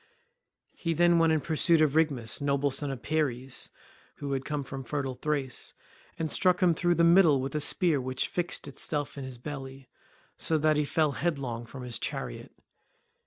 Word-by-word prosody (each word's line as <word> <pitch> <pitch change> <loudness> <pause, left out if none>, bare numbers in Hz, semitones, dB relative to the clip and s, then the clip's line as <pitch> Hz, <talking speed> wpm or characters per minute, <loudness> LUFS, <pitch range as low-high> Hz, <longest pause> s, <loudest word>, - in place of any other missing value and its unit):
He 165 -1 -2
then 175 +1 +4
went 165 -1 +4
in 155 -1 +2
pursuit 165 +2 +2
of 155 -2 +3
Rhigmus, 140 -9 +1
noble 140 0 +1
son 140 +2 -2
of 135 -4 -6
Peires, 135 -5 -1 0.5
who 140 -1 -5
had 135 -1 -1
come 150 -2 -2
from 135 0 -7
fertile 135 +2 -3
Thrace, 135 -1 -2 0.4
and 160 -2 -2
struck 180 -1 +3
him 180 -2 +4
through 175 +2 +1
the 170 - +3
middle 170 -4 +6
with 135 +1 -3
a 150 - 0
spear 155 -1 +2
which 130 0 -2
fixed 175 -3 -2
itself 145 +1 -2
in 140 - -6
his 130 -2 -6
belly, 135 -1 -8 0.5
so 160 - 0
that 155 0 +3
he 150 - +2
fell 155 0 +1
headlong 135 -7 -2
from 130 +2 -9
his 125 -2 -4
chariot. - - -5
145 Hz, 180 wpm, -29 LUFS, 135-160 Hz, 0.5 s, middle